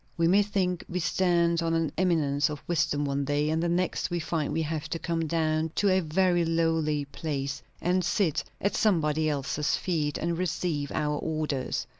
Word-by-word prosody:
We 165 0 +3
may 195 +4 +5
think 190 -4 -1
we 180 - -2
stand 170 +1 +2
on 165 0 0
an 165 -2 0
eminence 150 -5 +2
of 150 -1 -6
wisdom 145 -4 0
one 140 0 -1
day; 145 +2 0
and 160 +1 +1
the 170 - 0
next 175 -1 0
we 175 -1 -1
find 155 -2 -2
we 160 - 0
have 155 -1 -3
to - - -2
come 165 -1 -2
down 155 0 0
to 205 - +2
a 190 0 +4
very 175 +1 +2
lowly 165 -3 +1
place, 140 -1 -4 0.2
and 180 +1 +1
sit 175 -2 +1 0.2
at 200 - 0
somebody 160 -6 +2
else's 145 +1 0
feet, 155 -5 -1
and 170 +1 -2
receive 165 -5 -1
our 150 -1 -1
orders. 155 -4 -2
165 Hz, 185 wpm, -28 LUFS, 150-175 Hz, 0.2 s, may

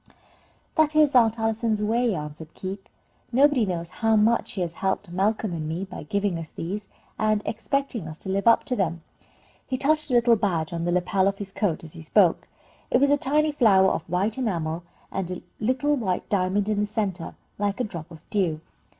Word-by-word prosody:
"That 310 -1 +3
is 305 -2 +5
Aunt 230 -2 +5
Allison's 225 -1 0
way," 230 0 +1
answered 150 +1 -7
Keith. 195 +1 -5 0.5
"Nobody 265 -3 +4
knows 170 -1 -3
how 225 0 +4
much 220 +2 +3
she 190 - -5
has 170 -2 -2
helped 190 0 -2
Malcolm 200 +2 0
and 155 -2 -3
me 175 +4 -3
by 190 - -8
giving 195 +2 -1
us 160 -2 -7
these, 195 +5 -5 0.3
and 215 -1 +2
expecting 230 - -2
us 155 0 -8
to - - -5
live 200 +3 0
up 230 - +6
to 250 - -2
them." 170 -6 -1 0.6
He 260 - -1
touched 305 +3 +1
a 250 - +2
little 240 -1 +5
badge 175 -7 -1
on 170 0 -2
the 175 - +1
lapel 185 +2 +2
of 200 0 0
his 200 -1 -7
coat, 195 -6 -1
as 160 - -11
he 165 - -10
spoke. 175 +2 +3 0.4
It 245 - +3
was 280 +1 +4
a - - +6
tiny 300 +2 +1
flower 195 -9 +5
of - - -4
white 200 +7 0
enamel, 170 -8 -1 0.3
with 190 -2 -3
a 180 -1 -6 0.2
little 255 -4 +1
diamond 195 +1 +1
in 215 -1 0
the 210 - +1
centre, 190 -6 -3 0.2
like 205 +2 -1
a - - +1
drop 170 -7 -6
of 165 -3 -14
dew. 175 -7 +1
200 Hz, 200 wpm, -25 LUFS, 175-230 Hz, 0.6 s, up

